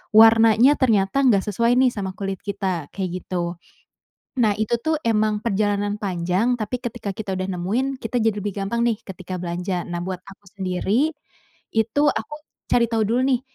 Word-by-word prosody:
warnanya 225 +4 +7
ternyata 220 -2 +2
nggak 200 -6 +4
sesuai 235 +4 +1
nih 255 0 +4
sama 195 -4 -5
kulit 195 -2 -4
kita 185 -6 -3
kayak 190 -2 -2
gitu, 175 -1 -3 0.8
nah 215 -3 +3
itu 220 +2 0
tuh 315 +5 0
emang 215 -2 +1
perjalanan 205 -1 0
panjang 185 +5 0
tapi 240 +3 -3
ketika 240 -4 -5
kita 200 -2 -4
udah 185 +1 -3
nemuin 255 +9 -1
kita 225 +2 -3
jadi 220 -2 +2
lebih 205 -1 -3
gampang 200 +4 -1
nih 230 -2 +2
ketika 185 -1 -8
belanja 180 +1 -3
nah 175 -1 -4
buat 185 0 -4
aku 195 +1 -15
sendiri, 195 - +1 0.6
itu 225 +6 +1
aku 300 - -4 0.4
cari 235 -1 +4
tahu 225 -1 +1
dulu 240 +3 +2
nih, 245 - 0
205 Hz, 170 wpm, -22 LUFS, 190-230 Hz, 0.8 s, warnanya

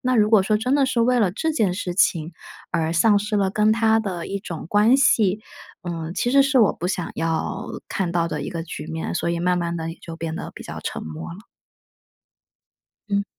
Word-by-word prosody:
那 255 0 +1
如 215 -2 +3
果 215 -4 +6
说 215 +1 +2
真 250 +6 0
的 275 -2 +3
是 245 -2 0
为 245 +1 +3
了 195 -6 +2
这 320 - -1
件 205 -11 +1
事 180 -2 -4
情 165 -4 +2 0.4
而 165 -1 0
丧 205 +5 +4
失 210 +1 -3
了 195 -1 +2
跟 215 +2 +3
他 225 0 +3
的 185 -6 -3
一 200 - -2
种 170 -6 -7
关 215 +5 +5
系， 215 -7 +3 0.4
嗯， 165 -2 -4
其 240 - 0
实 275 +1 +6
是 270 -3 +3
我 215 - +4
不 175 - -4
想 180 -2 -2
要 165 0 -2 0.2
看 180 -3 -2
到 170 -1 +1
的 150 -2 -3
一 - - -5
个 165 -2 -4
局 160 -1 -7
面， 160 0 -4
所 170 - -1
以 170 0 -2
慢 180 0 +1
慢 170 0 -2
地 165 0 -4
也 165 - -10
就 165 - -8
变 165 -1 -4
得 - - -6
比 - - -9
较 - - -7
沉 - - -5
默 80 0 -7
了。 185 - -10 1.7
嗯。 200 0 +1
190 Hz, 240 characters per minute, -23 LUFS, 170-220 Hz, 1.7 s, 果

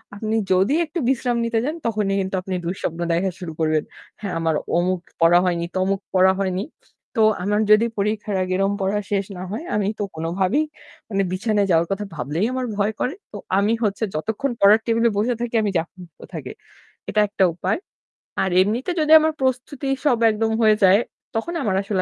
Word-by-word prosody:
আপনি 215 +2 -2 0.2
যদি 190 +8 +3
একটু 330 +3 -4
বিশ্রাম 245 -2 0
নিতে 230 -1 0
যান 305 +3 -2
তখনই 210 -3 0
কিন্তু 190 0 -3
আপনি 185 0 -4
দুঃস্বপ্ন 170 -1 -3
দেখা 185 +2 0
শুরু 175 -3 -6
করবেন। 155 -1 +1 0.4
হ্যাঁ, 200 -3 -4
আমার 165 -1 +1 0.2
অমুক 180 +1 +1 0.2
পড়া 170 +1 +6
হয়নি, 170 -1 0
তমুক 190 +1 +1
পড়া 185 0 +5
হয়নি। 190 0 -1 0.5
তো - - +4 0.2
আমার 210 +2 +1
যদি 215 +2 +6
পরীক্ষার 210 0 -1
আগে 185 0 -2
এরকম 195 +1 +1
পড়া 200 +2 0
শেষ 200 -1 +1
না 180 - -6
হয় 220 +10 -4
আমি 205 -2 +1
তো - - 0
কোনোভাবেই 185 - 0 0.4
মানে 195 -2 0
বিছানায় 205 +1 +1
যাওয়ার 165 0 +3
কথা 200 +1 -2
ভাবলেই 150 - -1
আমার 255 -1 -2
ভয় 210 +2 +1
করে। 265 - -1 0.2
তো 210 - -7 0.2
আমি 205 +3 +2
হচ্ছে 205 +1 -1
যতক্ষণ 220 - -2
পড়ার 205 +2 +6
টেবিলে 230 0 +2
বসে 230 +4 +1
থাকি, 240 -1 -3
আমি 205 - 0
চাপ 165 - -1
মুক্ত 175 -3 -14
থাকি, - - -6 0.6
এটা 215 - +1
একটা 200 - +1
উপায়। 180 - -1 0.6
আর 190 - +1
এমনিতে 230 - 0
যদি 310 0 +1
আমার 315 0 +1
প্রস্তুতি 260 +2 -1 0.2
সব 260 -5 +4
একদম 220 +1 -1
হয়ে 215 -1 +5
যায় 190 +2 +7 0.4
তখন 225 +10 -2
আমার 210 -7 0
আসলে 195 -1 -1
200 Hz, 190 wpm, -22 LUFS, 185-225 Hz, 0.6 s, যায়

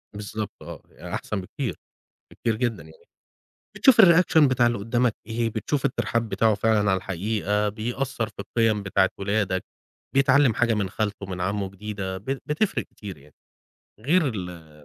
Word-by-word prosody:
بالضبط 105 0 -5
آه، - - -9 0.3
أحسن 105 -2 -3
بكتير، 90 - -4 0.6
بكتير 115 -2 -1
جدًا 120 -1 -1
يعني. 460 - -17 0.7
بتشوف 260 -5 +6
الreaction 175 -3 +6
بتاع 125 -2 +3
اللي 120 0 +1
قدامك 115 +2 +1
إيه، 115 +1 -1
بتشوف 125 +6 -2
الترحاب 115 -1 0
بتاعه 110 0 +2
فعلًا 110 +1 +2
على - - +3
الحقيقة، 105 +3 -1
بيأثر 120 +3 -3
في 105 - -22
القيم 110 -1 +1
بتاعة 95 -1 +2
ولادك، 100 -2 0 0.5
بيتعلم 140 -2 +4
حاجة 115 0 +2
من 100 -2 -1
خالته، 100 -1 -3
من 95 -1 -6
عمه 100 +1 -1
جديدة، 100 -1 -5
بت 130 +7 -4
بتفرق 175 +7 0
كتير 100 -3 -10
يعني. 70 +1 -20 0.7
غير 155 +6 +3
ال 90 -8 -6
110 Hz, 150 wpm, -25 LUFS, 100-120 Hz, 0.7 s, بتشوف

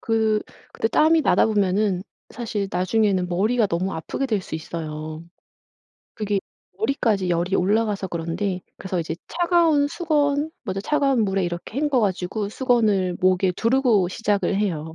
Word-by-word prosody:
그 220 -1 +1 0.3
그때 225 - -1
땀이 315 +3 +4
나다 - - +4
보면은 200 -2 +1 0.3
사실 215 -4 -3
나중에는 185 0 +1
머리가 215 +6 +2
너무 185 +1 -1
아프게 160 +11 -3
될 215 -6 0
수 180 - -8
있어요. 155 0 -6 0.9
그게 210 -2 -1 0.4
머리까지 220 - 0
열이 175 +3 0
올라가서 205 0 +1
그런데 175 +3 -3 0.2
그래서 190 -2 -4
이제 165 0 -3
차가운 340 -4 +3
수건, 295 -2 0
먼저 195 -3 -3
차가운 275 -1 +2
물에 195 -1 0
이렇게 175 +8 -5
헹궈가지고 210 -8 0
수건을 210 -7 +1
목에 185 0 +3
두르고 230 -4 +2
시작을 200 0 0
해요. 160 -6 -2
205 Hz, 330 characters per minute, -23 LUFS, 180-240 Hz, 0.9 s, 땀이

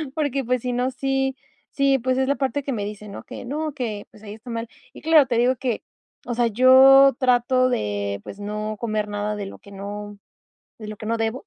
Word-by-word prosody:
porque, 280 -4 -1
pues, 250 0 0
si 250 - -2
no, 250 +1 0
sí, 270 0 -1 0.4
sí, 275 -1 +2
pues, 255 +1 0
es 265 0 +1
la 280 - +2
parte 280 +1 -1
que 275 - -3
me 210 -5 -2
dice, 210 0 -8
¿no?, 200 - -9
que - - -9
no, 300 +4 -3
que, 225 -7 -4
pues, 215 - -18
ahí 205 - -8
está 225 +3 -13
mal. 230 0 -4 0.2
Y - - -12
claro, 315 -2 +5
te 240 - -1
digo 250 +2 +2
que, 245 -3 -2 0.4
o 245 - -3
sea, 240 0 +2
yo 265 +4 +7
trato 255 0 +3
de, 100 - -2
pues, 195 - -10
no 210 +1 -4
comer 215 -2 -2
nada 205 0 -3
de 205 - -4
lo 195 - -10
que 200 - -16
no 205 +1 -7 0.6
de 215 - -8
lo 215 - -7
que 215 - -9
no 230 - 0
debo, 225 - -2
240 Hz, 230 wpm, -23 LUFS, 210-265 Hz, 0.6 s, yo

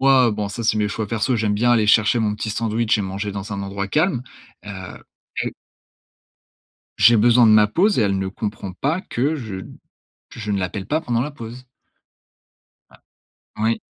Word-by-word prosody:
moi, 135 -2 +5
heu, - - +1
bon, 105 -1 -3
ça, 115 +3 -5
c'est 110 0 +2
mes 105 -1 +1
choix 105 +1 -3
perso. 115 +3 0
J'aime 105 -2 0
bien 120 +3 +2
aller 110 -3 +3
chercher 110 +2 +4
mon 105 -2 0
petit 110 - -4
sandwich 110 0 0
et - - -1
manger 100 +2 -4
dans 100 +1 -6
un 100 0 -4
endroit 100 0 -4
calme, 155 - +1 0.4
heu, - - -6 0.7
heu - - -2 1.5
J'ai 120 0 +7
besoin 120 +2 +5
de 110 - +6
ma 105 -1 +6
pause 185 - +2
et - - +3
elle 100 -2 +1
ne 95 0 -2
comprend 100 -1 -5
pas 155 - -1
que 145 - -1
je 110 -8 -6
n 95 - -10 0.5
que - - -12
je 105 -1 -5
ne 100 - 0
l'appelle 95 +2 -4
pas 155 +2 0
pendant 120 -6 -1
la 145 - -2
pause. 125 0 -10 1.9
Oui. 110 +2 0
110 Hz, 195 wpm, -21 LUFS, 105-120 Hz, 1.9 s, J'ai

